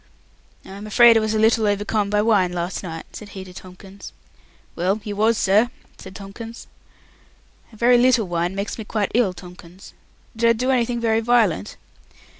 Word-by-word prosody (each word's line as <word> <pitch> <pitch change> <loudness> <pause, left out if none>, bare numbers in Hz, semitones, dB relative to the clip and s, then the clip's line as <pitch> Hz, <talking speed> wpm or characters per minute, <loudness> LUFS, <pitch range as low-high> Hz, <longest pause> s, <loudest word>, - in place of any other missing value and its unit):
"I - - -13
am 200 +2 -9
afraid 235 +2 +6
I - - +5
was 220 0 -1
a - - +1
little 220 0 +3
overcome 205 0 -1
by 210 0 +1
wine 200 -5 +2
last 175 +1 -3
night," 165 -3 -9
said 210 - -9
he 190 - -6
to 185 -1 -13
Tomkins. 190 +2 -12 0.6
"Well, 190 +5 0
you 205 -1 -5
was, 220 +2 +2
sir," 210 +5 +3 0.3
said 190 0 -11
Tomkins. 225 +4 -9 1.1
"A - - -16
very 240 +2 +4
little 245 -4 +3
wine 175 +1 -2
makes 200 +3 -4
me - - -4
quite 210 -1 -2
ill, 230 -5 +2
Tomkins. 180 +1 -14 0.4
Did 230 +1 +2
I - - +5
do 250 +3 -1
anything 240 -1 0
very 225 -1 +1
violent?" 225 - +1
210 Hz, 180 wpm, -21 LUFS, 190-230 Hz, 1.1 s, afraid